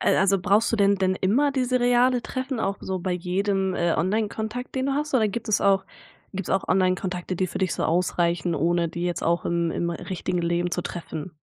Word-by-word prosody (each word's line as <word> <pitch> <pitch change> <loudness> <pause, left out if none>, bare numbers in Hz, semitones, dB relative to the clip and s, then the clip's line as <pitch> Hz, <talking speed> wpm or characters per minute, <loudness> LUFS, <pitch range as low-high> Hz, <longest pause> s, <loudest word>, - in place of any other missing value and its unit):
Äh, - - +3
also 195 0 +3
brauchst 205 +6 +2
du - - +2
denn 200 -1 +4
denn 185 -1 +1
immer 250 +11 +2
diese 255 -1 +1
reale 245 +1 +3
Treffen 260 +1 -4
auch 200 -2 -1
so 190 0 -3
bei 185 +1 -2
jedem, 190 +2 0
äh, 170 -1 +1
Onlinekontakt 220 +5 -2
den 260 0 0
du 275 - 0
hast 295 +1 -2
oder 220 -4 +4
gibt 230 +3 -5
es 210 - +2
auch 195 -1 +3 0.5
gibt's 195 -2 -4
auch 195 - +1
Onlinekontakte, 185 -1 0
die 185 +1 0
für - - -5
dich 185 -2 0
so - - -2
ausreichen 170 0 +1
ohne 170 +3 +1
die 170 +2 -4
jetzt 175 -1 -2
auch 170 +1 +1
im 170 -1 0
im 170 +1 -1
richtigen 175 +1 -3
Leben 170 +1 0
zu 180 - 0
treffen? 170 -1 -6
190 Hz, 215 wpm, -25 LUFS, 175-220 Hz, 0.5 s, denn